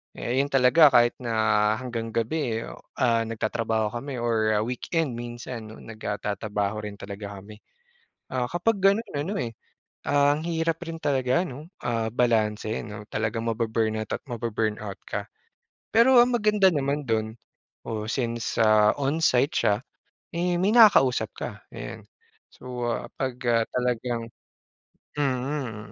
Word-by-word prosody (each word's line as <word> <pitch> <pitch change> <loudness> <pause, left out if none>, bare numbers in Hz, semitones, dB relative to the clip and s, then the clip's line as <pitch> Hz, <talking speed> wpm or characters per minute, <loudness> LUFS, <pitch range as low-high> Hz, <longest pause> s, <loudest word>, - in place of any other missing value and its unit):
Eh, 125 +2 -1
yun - - -3
talaga, 135 +3 +6
kahit 120 0 +5
na 110 -2 +2
hanggang 115 -3 -4
gabi, 115 -1 -1
oh, - - -11 0.2
ah, 115 -2 +3
nagtatrabaho 110 0 -1
kami 130 -1 -5
or, 110 -2 +1
ah, 105 - +2
weekend 130 +3 -2
minsan 120 -1 -7
'no, 110 - -11
nag, 110 -1 -11
ah, 105 - -1
tatrabaho 105 0 -2
rin 105 - -6
talaga 100 0 -7
kami. 105 +2 -12 0.7
Ah, 130 -1 0
kapag 190 +6 +1
ganon 200 +4 +3
ano, 155 +8 -2
eh, 115 -1 -3 0.6
ah, 145 0 +4
ang - - -5
hirap 165 -1 -1
rin 165 0 -5
talaga 130 -1 +2
'no? 150 +1 -9
Ah, 115 -2 -1
balanse 110 -3 +1
'no, 105 -1 -8
talagang 110 +1 -2
mabu-burn 110 -1 0
out 110 - -6
at - - -9
mabu-burn 110 -2 -1
out 100 -2 -6
ka. - - -4 0.7
Pero 245 +3 +7
ang 245 +1 +4
maganda 210 -4 +4
naman 145 0 -1
do'n 110 -1 0 0.5
oo, 110 -2 -3
since 120 -2 -2
sa 110 -1 +5
onsite 140 -1 +2
siya, 100 - +3 0.6
eh, 175 +1 +1
may 195 +3 +2
nakakausap 200 - +6
ka, - - -4 0.2
ayan. - - -7 0.5
So, 125 -1 -5
ah, - - -3
'pag, 130 -2 -1 0.2
ah, 115 -1 +3
talagang 125 -1 -1 0.9
mm, 130 -4 -2
120 Hz, 150 wpm, -26 LUFS, 110-145 Hz, 0.9 s, Pero